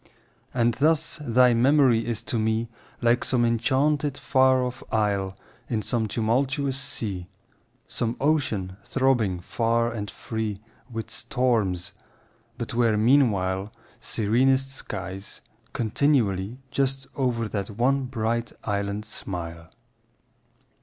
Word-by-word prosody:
And 120 -1 +2
thus 155 +4 +1
thy 125 -2 +4
memory 125 -1 +4
is 115 -2 -2
to 115 - -1
me 110 +1 0 0.3
Like 120 +1 +3
some 120 -2 +2
enchanted 135 +4 +1
far 130 -1 +3
off 125 0 -4
isle 100 -3 0 0.3
In 110 -3 -1
some 115 -3 0
tumultuous 130 +6 0
sea— 100 -9 -2 0.6
Some 115 0 -2
ocean 130 -11 0
throbbing 115 -8 +1
far 115 +4 0
and 105 -3 -4
free 110 -3 -4 0.3
With 115 -1 -5
storms—but 115 -11 -2
where 115 -2 +3
meanwhile 105 -5 +2 0.3
Serenest 130 +5 +2
skies 95 -6 -5 0.3
continually 115 -4 +1
Just 135 0 0
o'er 120 -4 0
that 100 -2 -3
one 130 +6 +1
bright 115 -1 -2
island 100 +1 -2
smile. 85 -5 -5
115 Hz, 105 wpm, -25 LUFS, 105-130 Hz, 0.6 s, thy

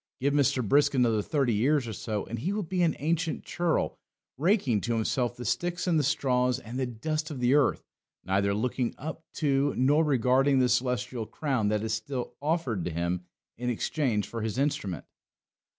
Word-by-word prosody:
Give 140 +2 +1
Mr. 140 -4 +2
Brisk 140 +3 +4
another 115 -4 +3
thirty 135 0 +1
years 130 +5 +2
or 110 - -4
so 105 0 -3
and 115 - -5
he 175 - -1
will 210 0 -1
be 185 +1 -1
an 170 -2 +2
ancient 165 +2 -1
churl, 175 -2 -1 0.4
raking 145 - +2
to 120 -1 -1
himself 120 +2 0
the 120 - -6
sticks 175 0 -1
and 170 -4 +3
the - - +1
straws 125 -3 +1
and 125 0 -7
the 130 - 0
dust 155 +7 -3
of 145 -4 -6
the 125 +1 +3
earth, 145 -1 +3 0.4
neither 100 +2 +1
looking 125 +2 -1
up 160 +3 -6
to 140 -2 +1
nor 145 +5 +4
regarding 135 0 +3
the 125 -1 +3
celestial 125 -2 0
crown 130 -3 -1
that 105 0 0
is 110 0 -1
still 120 +3 -4
offered 145 - 0
to - - -1
him 85 +2 -2 0.3
in 125 0 -1
exchange 120 -3 0
for 115 - -5
his 110 0 -3
instrument. 135 - -1
130 Hz, 185 wpm, -28 LUFS, 115-150 Hz, 0.4 s, Brisk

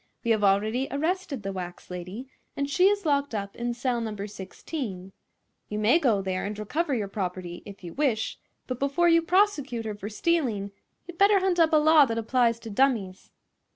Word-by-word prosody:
We 235 - +1
have 215 -2 +2
already 215 +6 +2
arrested 315 - -2
the 195 - -3
wax 180 -1 -7
lady, 180 +8 -7 0.3
and 280 - 0
she 360 +6 +3
is 405 -2 +1
locked 280 -4 +1
up 200 -1 -4
in 240 0 -3
cell 245 -1 -1
No. 210 -3 -4
16. 195 - -6 0.6
You 210 - -3
may 220 +10 +4
go 225 - +2
there 185 -1 -2
and 205 +1 -4
recover 285 - -1
your 210 -4 -2
property, 180 -3 -5
if 200 -1 -11
you 170 - -7
wish, 260 -7 -1 0.3
but 255 -1 -5
before 280 +5 +2
you 335 0 +5
prosecute 325 - +1
her 215 - -3
for 205 0 -7
stealing 220 -6 0 0.4
you'd 350 -1 -10
better 400 0 +6
hunt 370 -2 +1
up 325 -1 +5
a 310 - +5
law 305 -1 +6
that 230 -3 -3
applies 230 0 +1
to 225 - -8
dummies." 205 -6 0
235 Hz, 190 wpm, -27 LUFS, 200-300 Hz, 0.6 s, better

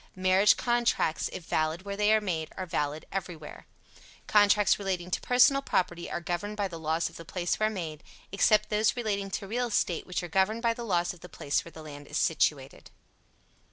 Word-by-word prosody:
Marriage 185 +2 +4
contracts, 240 -9 +1
if 180 - -7
valid 160 +3 -1
where 200 0 -5
they 210 +1 +2
are 220 - +5
made, 170 -6 -3
are 190 - -3
valid 150 -2 -2
everywhere. 175 -5 -6 0.6
Contracts 205 -1 +4
relating 185 -3 -3
to - - -1
personal 250 +3 +4
property 175 -9 -1
are - - -3
governed 175 +5 -4
by 200 -1 0
the 170 -3 -8
laws 160 +1 0
of - - -11
the 165 - -9
place 175 +1 -2
where 215 0 +2
made, 165 -7 -6 0.3
except 210 +2 +3
those 215 0 +2
relating 200 -4 -2
to 195 +1 -4
real 240 +5 -1
estate, 185 -6 -1
which 180 0 -3
are - - -4
governed 195 +7 +1
by 230 -1 +3
the 235 - -7
laws 175 -5 0
of 180 - -16
the 180 - -12
place 145 -3 -1
where 170 - -12
the 160 - -11
land 145 -1 -10
is - - -4
situated. 145 -4 0
185 Hz, 200 wpm, -28 LUFS, 165-210 Hz, 0.6 s, are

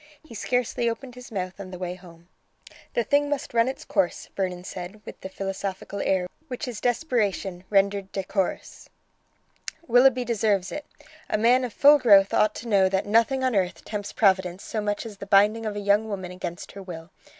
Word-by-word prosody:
He 315 - -13
scarcely 245 +1 0
opened 245 +2 -6
his 250 0 -12
mouth 185 -2 -4
on 195 -2 -7
the 185 - -7
way 180 0 -4
home." 175 -2 -15 0.7
"The 235 - +2
thing 285 +5 +2
must 290 -3 -3
run 230 0 +3
its 265 - -5
course," 190 -5 -1
Vernon 180 -2 -2
said, 185 +2 -7
with - - -10
the 190 - -6
philosophical 195 +1 -4
air 185 -2 +1 0.2
which 255 +1 -5
is 235 -4 -6
desperation 210 - -1
rendered 200 -1 +2
decorous. 195 0 -3 1.0
"Willoughby 250 +1 +5
deserves 210 -5 +1
it. 295 - -6 0.4
A - - +1
man 245 +4 +4
of 245 - -3
full 290 +6 +6
growth 200 -6 +6
ought 215 0 +3
to 235 - -7
know 195 -4 +4
that 190 0 0
nothing 230 +5 +2
on 255 -3 +1
earth 185 -2 -1
tempts 205 -1 -4
Providence 190 -3 +2
so 215 - -3
much 205 +2 -2
as 215 -3 -8
the 200 - -8
binding 210 +3 +4
of 210 - -3
a - - -3
young 205 +2 +2
woman 190 -3 -5
against 175 -1 -6
her 200 - -9
will. 175 -2 -9
205 Hz, 190 wpm, -25 LUFS, 190-235 Hz, 1.0 s, full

